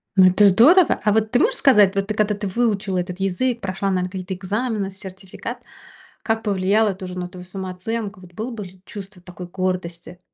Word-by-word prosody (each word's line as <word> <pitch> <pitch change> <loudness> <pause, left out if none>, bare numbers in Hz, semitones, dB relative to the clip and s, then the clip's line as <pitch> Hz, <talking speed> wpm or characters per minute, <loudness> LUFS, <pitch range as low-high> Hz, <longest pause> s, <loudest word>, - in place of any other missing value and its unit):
Ну, 190 -1 +7
это 190 +3 +6
здорово! 290 - +6
А, 210 - +3
вот, 220 0 +1
ты 245 - +3
можешь - - +2
сказать, 210 -7 +5
вот, 195 0 0
ты, 215 - -1
когда 210 -1 +1
ты 205 -1 -4
выучила 205 -3 0
этот 180 +1 -3
язык, 235 +6 -1
прошла, 195 +1 -2
наверно, 185 -1 0
какие-то 185 0 -5
экзамены, 200 +2 -2
сертификат. 190 -1 -9 0.6
Как 225 0 -1
повлияло 205 +1 +2
это, 190 0 -5
уже, 180 0 -7
на 180 0 -3
твою 180 0 -11
самооценку? 190 +2 -5
Вот, 175 -1 -15
было 225 +7 -5
бы, 210 -4 -6
ли, 185 0 -15
чувство 195 -2 -10
такой 180 0 -10
гордости? 180 -1 -4
195 Hz, 195 wpm, -21 LUFS, 185-215 Hz, 0.6 s, Ну